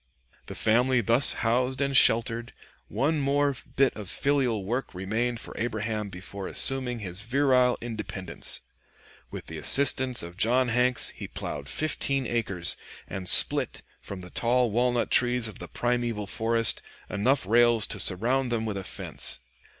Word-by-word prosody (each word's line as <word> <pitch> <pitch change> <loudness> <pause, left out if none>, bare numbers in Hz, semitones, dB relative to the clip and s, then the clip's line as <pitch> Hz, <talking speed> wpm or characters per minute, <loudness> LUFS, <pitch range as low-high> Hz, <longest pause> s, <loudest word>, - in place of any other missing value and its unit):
The - - -7
family 125 +3 +2
thus 115 +5 +5
housed 125 +3 0
and 140 -1 -1
sheltered, 115 -1 +3 0.3
one 150 +3 -1
more 140 0 +1 0.2
bit 135 -1 +2
of 105 -4 -8
filial 130 -8 0
work 120 0 -4
remained 110 +6 -2
for - - -6
Abraham 110 -2 -3
before 95 +1 -8
assuming 130 -2 +2
his 95 -3 -6
virile 125 +1 +2
independence. 110 -6 -5 0.7
With - - -8
the 80 -1 -8
assistance 130 - +2
of 85 +1 -9
John 125 +4 +2
Hanks 125 +1 +3
he - - -9
plowed 70 -1 -7
fifteen 140 -3 -1
acres, 100 -8 -1 0.3
and 95 -2 -1
split, - - +4 0.2
from 100 -2 -9
the 90 - -10
tall 120 0 +1
walnut 120 +2 0
trees 125 -1 +2
of 110 - -10
the - - -7
primeval 120 -3 -2
forest, 115 +3 +1 0.3
enough 120 +4 0
rails 115 +1 +4
to - - -3
surround 120 +7 +1
them 115 -1 -1
with 105 -2 -3
a 95 - -5
fence. - - -4
120 Hz, 150 wpm, -26 LUFS, 105-130 Hz, 0.7 s, thus